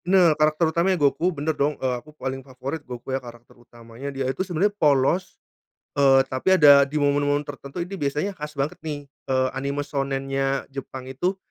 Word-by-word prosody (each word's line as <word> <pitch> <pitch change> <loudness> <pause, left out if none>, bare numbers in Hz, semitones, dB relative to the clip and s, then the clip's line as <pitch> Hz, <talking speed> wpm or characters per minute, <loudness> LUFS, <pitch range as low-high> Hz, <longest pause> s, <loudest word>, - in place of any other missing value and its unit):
Nah 180 -3 +5
karakter 155 +2 +2
utamanya 180 +3 +2
Goku 150 +4 +2
bener 160 -2 -2
dong, 145 0 0
eee, 130 -1 -1
aku 155 - -18
paling 135 -1 -4
favorit 135 +3 -6
Goku 125 -1 -7
ya 135 - -1
karakter 120 -1 -13
utamanya 120 +2 -10
dia 135 -1 -3
itu 130 +6 -2
sebenarnya 190 +2 0
polos, 150 -1 +2 0.6
eee, 135 -1 +5
tapi 135 +8 +2
ada 140 -4 +7
di 150 - -5
momen-momen 145 0 +2
tertentu 145 +4 -6
ini 185 +3 -8
biasanya 150 +8 -1
khas 150 -4 -8
banget 140 +2 -2
nih, 150 -2 -5 0.2
eee, 130 0 +2
anime 140 +2 -3
shounen-nya 135 -1 -1
Jepang 135 -1 -7
itu 140 +9 -2
140 Hz, 175 wpm, -24 LUFS, 135-155 Hz, 0.6 s, ada